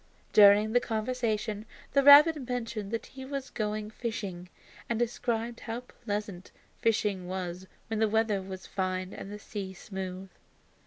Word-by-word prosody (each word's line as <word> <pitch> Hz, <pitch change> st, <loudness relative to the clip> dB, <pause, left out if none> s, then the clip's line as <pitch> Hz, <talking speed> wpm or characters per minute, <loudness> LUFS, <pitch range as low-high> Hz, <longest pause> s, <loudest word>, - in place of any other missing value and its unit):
During 210 Hz, +1 st, +7 dB
the 245 Hz, -, +6 dB
conversation 220 Hz, -2 st, -2 dB, 0.3 s
the 280 Hz, -, +5 dB
rabbit 285 Hz, 0 st, +8 dB
mentioned 230 Hz, -4 st, -3 dB
that 230 Hz, +1 st, -3 dB
he 265 Hz, 0 st, -10 dB
was 270 Hz, 0 st, -5 dB
going 215 Hz, 0 st, -3 dB
fishing, 200 Hz, -6 st, -5 dB, 0.4 s
and 235 Hz, -, 0 dB
described 235 Hz, 0 st, -1 dB
how 230 Hz, +1 st, -5 dB
pleasant 205 Hz, -6 st, -5 dB, 0.3 s
fishing 205 Hz, -5 st, +1 dB
was 185 Hz, 0 st, -5 dB, 0.2 s
when 220 Hz, -1 st, -3 dB
the 220 Hz, -1 st, +3 dB
weather 220 Hz, -2 st, +1 dB
was 190 Hz, 0 st, -8 dB
fine 185 Hz, -1 st, -2 dB
and 195 Hz, -, -8 dB
the 210 Hz, -, -6 dB
sea 200 Hz, -2 st, -6 dB
smooth. 190 Hz, -1 st, -6 dB
215 Hz, 145 wpm, -29 LUFS, 190-235 Hz, 0.4 s, rabbit